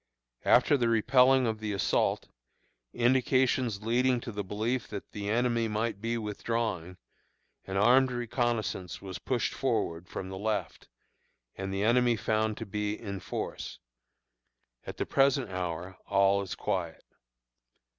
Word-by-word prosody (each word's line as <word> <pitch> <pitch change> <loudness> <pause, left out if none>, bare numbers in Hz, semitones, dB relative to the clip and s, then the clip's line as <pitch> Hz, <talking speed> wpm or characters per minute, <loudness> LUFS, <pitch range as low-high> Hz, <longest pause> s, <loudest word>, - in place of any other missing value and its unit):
After 145 - +5
the 120 -3 +1
repelling 125 +3 +4
of 110 -2 -1
the 105 -1 -3
assault, 95 - +1 0.6
indications 125 -3 +2
leading 125 +2 +2
to 120 - -6
the 105 -1 -4
belief 110 +6 -2
that 100 -2 -7
the 100 -1 -4
enemy 120 0 +1
might 110 -1 -2
be 115 +1 -1
withdrawing, 105 -4 -3 0.7
an 95 0 -2
armed 125 +6 +5
reconnoissance 120 -6 -2
was 95 -5 -7
pushed - - -1
forward 85 +1 -1
from 95 - -5
the 95 0 -6
left, 110 +1 -3 0.7
and 95 0 -4
the 95 +1 -1
enemy 120 +1 +4
found 110 0 0
to 115 - -5
be 105 +1 -3
in 100 -3 -5
force. 90 - -5 1.1
At - - -6
the - - -1
present 135 -5 +2
hour 90 0 -4
all 100 0 +3
is 95 -3 -5
quiet. - - -3
110 Hz, 135 wpm, -29 LUFS, 100-120 Hz, 1.1 s, After